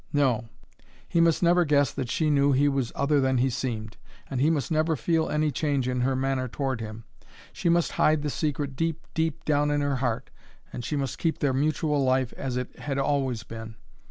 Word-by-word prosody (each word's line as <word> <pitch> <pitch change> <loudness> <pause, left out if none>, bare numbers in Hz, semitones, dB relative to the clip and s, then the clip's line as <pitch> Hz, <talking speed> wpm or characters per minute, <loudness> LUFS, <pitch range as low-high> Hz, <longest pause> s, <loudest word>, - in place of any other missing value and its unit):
No; 125 -5 +1 0.6
he 170 - +2
must 165 +1 +3
never 175 +1 +5
guess 145 -5 +3
that 130 -3 -4
she 155 +3 +1
knew 140 -1 +4
he 140 +2 +3
was 135 -4 0
other 140 0 +2
than 130 -1 +2
he 130 +2 +2
seemed, 110 -3 -4 0.3
and 130 -2 -1
he 150 - +4
must 160 -1 -1
never 160 +1 +2
feel 160 +5 0
any 150 0 +1
change 140 -2 0
in 125 -1 -1
her 130 +1 +1
manner 130 0 0
toward 130 -1 -3
him. 110 0 -7 0.5
She 170 - -1
must 170 0 +2
hide 155 -1 +2
the 150 - -1
secret 145 -2 -2
deep, 165 +2 -2
deep 160 -2 -1
down 150 -1 +2
in 145 0 +1
her 145 -1 0
heart, 120 -3 -2 0.4
and 120 - -5
she 150 - -2
must 135 -2 -2
keep 165 -2 0
their 140 -2 +1
mutual 150 +1 +1
life 130 -1 +1
as 130 -2 -4
it 125 - -5
had 140 -2 -3
always 135 -4 0
been. 110 0 -8
140 Hz, 210 wpm, -26 LUFS, 130-150 Hz, 0.6 s, never